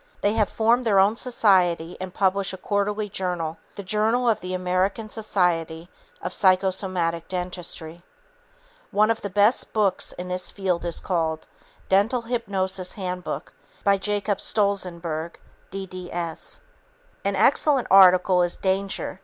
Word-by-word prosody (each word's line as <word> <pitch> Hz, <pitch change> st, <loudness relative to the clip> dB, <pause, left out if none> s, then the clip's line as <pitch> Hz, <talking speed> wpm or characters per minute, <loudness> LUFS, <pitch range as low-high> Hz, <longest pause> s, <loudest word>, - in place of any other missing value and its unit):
They 205 Hz, -, +2 dB
have 215 Hz, -2 st, +1 dB
formed 235 Hz, +3 st, +2 dB
their 215 Hz, -4 st, +2 dB
own 195 Hz, +3 st, +4 dB
society 185 Hz, -9 st, +2 dB
and 185 Hz, -1 st, -5 dB
publish 195 Hz, 0 st, 0 dB
a -, -, -6 dB
quarterly 205 Hz, +2 st, -1 dB
journal, 175 Hz, -4 st, -3 dB, 0.2 s
The 200 Hz, -, -7 dB
Journal 220 Hz, +5 st, +1 dB
of 225 Hz, -3 st, +2 dB
the 185 Hz, +1 st, -4 dB
American 185 Hz, +4 st, -1 dB
Society 175 Hz, -6 st, -1 dB, 0.3 s
of 180 Hz, -, -3 dB
Psychosomatic 185 Hz, -3 st, +1 dB
Dentistry. 180 Hz, -2 st, -6 dB, 0.9 s
One 215 Hz, +2 st, +3 dB
of 225 Hz, -, -2 dB
the 200 Hz, -, -4 dB
best 205 Hz, +5 st, +2 dB
books 210 Hz, -3 st, +1 dB
in 180 Hz, -, -7 dB
this 180 Hz, 0 st, -3 dB
field 185 Hz, -3 st, -2 dB
is 170 Hz, -, -2 dB
called 160 Hz, -3 st, -2 dB, 0.4 s
Dental 215 Hz, +6 st, +2 dB
Hypnosis 195 Hz, -6 st, -1 dB
Handbook 180 Hz, -2 st, -5 dB, 0.3 s
by 200 Hz, -1 st, +3 dB
Jacob 205 Hz, 0 st, -1 dB
Stolzenberg, 170 Hz, -6 st, -1 dB, 0.3 s
D.D.S. 180 Hz, -3 st, -5 dB, 0.6 s
An 200 Hz, 0 st, 0 dB
excellent 270 Hz, +5 st, +3 dB
article 185 Hz, -1 st, +6 dB
is 175 Hz, 0 st, 0 dB
"Danger! 190 Hz, 0 st, -2 dB
190 Hz, 130 wpm, -24 LUFS, 180-205 Hz, 0.9 s, article